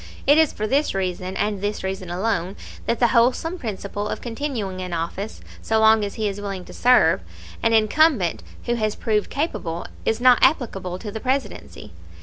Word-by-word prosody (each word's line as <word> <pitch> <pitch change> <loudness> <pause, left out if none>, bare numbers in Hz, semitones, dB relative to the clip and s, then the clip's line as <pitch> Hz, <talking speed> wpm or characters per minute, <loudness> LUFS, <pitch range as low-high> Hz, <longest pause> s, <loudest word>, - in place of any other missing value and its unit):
It 290 +3 +6
is 320 -2 +4
for 215 - -4
this 275 +1 +1
reason, 185 0 -3
and 205 -1 -1
this 205 0 -2
reason 190 -1 -4
alone, 185 0 -1 0.3
that 235 - 0
the 240 - +4
wholesome 260 +9 +2
principle 205 -3 -4
of - - -3
continuing 225 -6 -4
in 180 -1 -5
office, 170 +6 -4 0.2
so 220 0 +1
long 220 0 +5
as 200 - -4
he 215 -1 -1
is 205 0 -4
willing 195 -3 -5
to - - -12
serve, 250 +1 +4 0.4
an 230 0 +2
incumbent 220 - +3 0.2
who 240 - 0
has 215 -3 -1
proved 215 -3 0
capable, 175 - -3 0.2
is 225 - 0
not 250 0 +6
applicable 195 - +1
to 210 +2 -7
the 220 - -5
Presidency. 265 +3 -3
215 Hz, 180 wpm, -22 LUFS, 190-245 Hz, 0.4 s, It